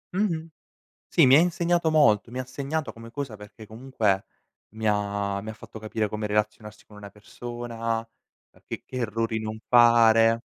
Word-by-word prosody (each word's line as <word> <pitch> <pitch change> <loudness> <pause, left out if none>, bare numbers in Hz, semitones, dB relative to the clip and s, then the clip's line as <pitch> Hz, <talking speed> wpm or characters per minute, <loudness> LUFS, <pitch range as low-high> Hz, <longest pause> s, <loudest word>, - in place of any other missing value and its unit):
Mh-mh. 170 -5 -1 0.6
Sì - - +5
mi 130 +2 +7
ha - - +7
insegnato 170 -1 +1
molto. 115 -9 +3
Mi 125 - -6
ha 130 - -3
segnato 140 +3 -3
come 115 0 -12
cosa 135 -3 -5
perché 105 +1 -13
comunque 110 -4 -1 0.5
mi 110 +1 -5
ha 100 -1 -1
mi 110 - -6
ha - - -6
fatto 110 +1 -12
capire 110 0 -2
come 105 +1 -4
relazionarsi 105 0 -3
con 105 - -16
una 100 -1 -10
persona, 115 +2 -5 0.5
e - - -26
che - - -6
che - - -8
errori 115 -1 -1
non 110 0 -5
fare. 115 -1 +5
115 Hz, 170 wpm, -25 LUFS, 105-130 Hz, 0.6 s, mi